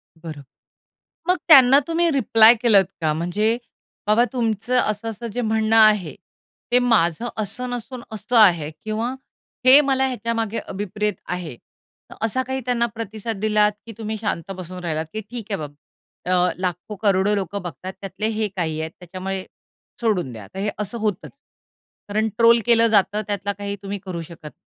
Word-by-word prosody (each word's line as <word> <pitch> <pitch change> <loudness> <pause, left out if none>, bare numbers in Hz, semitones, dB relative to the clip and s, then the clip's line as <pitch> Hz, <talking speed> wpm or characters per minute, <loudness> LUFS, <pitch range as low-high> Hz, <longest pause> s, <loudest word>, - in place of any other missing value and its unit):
बरं. 160 -3 -9 0.9
मग 365 - +4
त्यांना 270 -4 +8
तुम्ही 335 +1 +1
रिप्लाय 230 -4 +6
केलत 205 -5 +5 0.2
का? 155 -1 +1
म्हणजे 205 +8 0 0.5
बाबा 220 +3 +4
तुमचं 230 0 0
असं-असं 225 +1 -2
जे 245 - -2
म्हणणं 220 0 +1
आहे 210 -7 +4 0.6
ते 245 - +6
माझं 230 -3 +2
असं 245 +4 -4
नसून 245 0 -6
असं 220 +3 -1
आहे 175 -9 +5
किंवा 220 +3 -2 0.5
हे 260 +3 +9
मला 265 -2 +1
ह्याच्यामागे 230 -2 -2
अभिप्रेत 210 +2 -2
आहे 175 -8 -5 0.6
असा 225 +4 0
काही 265 0 -2
त्यांना 245 -1 +1
प्रतिसाद 220 0 -5
दिलात 210 -1 +3
की 230 - -8
तुम्ही 220 -1 -4
शांत 200 -4 -3
बसून 185 0 -7
राहिलात 160 -2 -2
की 220 - -3
ठीक 225 +1 -8
आहे 200 - 0
बाबा 145 -1 -7 0.6
अ, 180 0 +3
लाखो 180 +3 -4
करोडो 200 0 +3
लोकं 200 0 -3
बघतात 180 +3 -7
त्यातले 195 +2 -3
हे 220 -1 -1
काही 160 -4 -2
आहेत 160 0 -4
त्याच्यामुळे, 185 +2 -5 0.6
सोडून 200 - 0
द्या, 105 -3 -10
तर 190 - -9
हे 205 +2 -1
असं 210 +3 -3
होतचं. 210 -4 -2 0.8
कारण 215 +2 0
ट्रोल 235 0 +6
केलं 230 -1 +5
जातं 210 -1 +2
त्यातला 200 -1 -2
काही 200 0 -5
तुम्ही 200 0 -4
करू 180 -3 -5
शकत 160 -2 -11
210 Hz, 160 wpm, -22 LUFS, 185-230 Hz, 0.9 s, हे